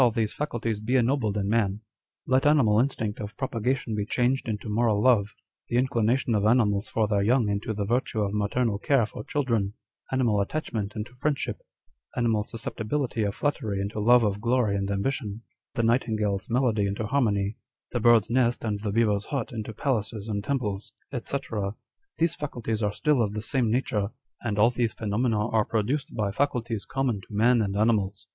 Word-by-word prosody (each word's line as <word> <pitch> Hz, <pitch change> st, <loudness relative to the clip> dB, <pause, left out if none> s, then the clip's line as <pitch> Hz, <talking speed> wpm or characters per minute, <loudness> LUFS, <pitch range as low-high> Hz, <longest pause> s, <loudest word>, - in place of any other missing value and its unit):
these 110 Hz, -3 st, 0 dB
faculties 115 Hz, -7 st, -2 dB
be 115 Hz, +5 st, -1 dB
ennobled 120 Hz, -4 st, +2 dB
in 100 Hz, -1 st, -1 dB
man: 105 Hz, -2 st, +1 dB, 0.5 s
let 130 Hz, +2 st, +3 dB
animal 120 Hz, -8 st, +4 dB
instinct 115 Hz, -5 st, -1 dB
of 105 Hz, 0 st, -7 dB
propagation 125 Hz, -1 st, -1 dB
be 105 Hz, -1 st, 0 dB
changed 125 Hz, +4 st, 0 dB
into 105 Hz, +1 st, -3 dB
moral 110 Hz, 0 st, +2 dB
love; 105 Hz, -3 st, +3 dB, 0.3 s
the 120 Hz, -, 0 dB
inclination 120 Hz, -1 st, +1 dB
of 105 Hz, -2 st, +2 dB
animals 110 Hz, -2 st, +3 dB
for 110 Hz, -2 st, 0 dB
their 100 Hz, -1 st, +1 dB
young 115 Hz, +2 st, +3 dB
into 100 Hz, +3 st, -1 dB
the 105 Hz, -1 st, -2 dB
virtue 120 Hz, +1 st, 0 dB
of 100 Hz, -1 st, -1 dB
maternal 105 Hz, +1 st, 0 dB
care 135 Hz, 0 st, +3 dB
for 105 Hz, -, -8 dB
children; 115 Hz, -8 st, -1 dB, 0.4 s
animal 120 Hz, -6 st, +2 dB
attachment 105 Hz, -4 st, -3 dB
into 110 Hz, +3 st, -5 dB
friendship; 140 Hz, +3 st, -2 dB, 0.6 s
animal 115 Hz, -3 st, +2 dB
susceptibility 115 Hz, +2 st, -3 dB
of 100 Hz, -1 st, -1 dB
flattery 115 Hz, -9 st, -1 dB
into 100 Hz, +2 st, -3 dB
love 120 Hz, +3 st, +5 dB
of 105 Hz, -1 st, 0 dB
glory 120 Hz, -3 st, +2 dB
and 100 Hz, 0 st, -1 dB
ambition; 105 Hz, +1 st, -2 dB, 0.3 s
the 115 Hz, -, +1 dB
nightingale's 110 Hz, -4 st, +1 dB
melody 115 Hz, -4 st, +2 dB
into 100 Hz, +2 st, -2 dB
harmony; 105 Hz, -5 st, +1 dB, 0.3 s
the 120 Hz, -, -1 dB
bird's 115 Hz, -2 st, +5 dB
nest 120 Hz, 0 st, +1 dB
and 105 Hz, -3 st, -1 dB
the 105 Hz, -1 st, -2 dB
beaver's 105 Hz, -2 st, +2 dB
hut 140 Hz, -2 st, -3 dB
into 110 Hz, -2 st, -5 dB
palaces 110 Hz, -3 st, -2 dB
and 100 Hz, -2 st, -2 dB
temples, 110 Hz, -7 st, -2 dB, 0.3 s
&c.: 140 Hz, -, -2 dB, 0.8 s
these 165 Hz, 0 st, +2 dB
faculties 115 Hz, -6 st, -3 dB
are 105 Hz, -2 st, +1 dB
still 145 Hz, +3 st, +2 dB
of 105 Hz, -2 st, -1 dB
the 105 Hz, -, -2 dB
same 120 Hz, -1 st, +1 dB
nature, 110 Hz, -4 st, 0 dB, 0.3 s
and 105 Hz, -4 st, -2 dB
all 110 Hz, +4 st, +5 dB
these 120 Hz, -2 st, 0 dB
phenomena 110 Hz, 0 st, 0 dB
are 110 Hz, -1 st, +3 dB
produced 130 Hz, +9 st, -1 dB
by 105 Hz, -3 st, 0 dB
faculties 115 Hz, -4 st, -1 dB
common 130 Hz, -7 st, -1 dB
to -, -, -17 dB
man 115 Hz, +3 st, +3 dB
and 100 Hz, -1 st, -1 dB
animals. 105 Hz, -2 st, +1 dB
110 Hz, 175 wpm, -26 LUFS, 105-125 Hz, 0.8 s, love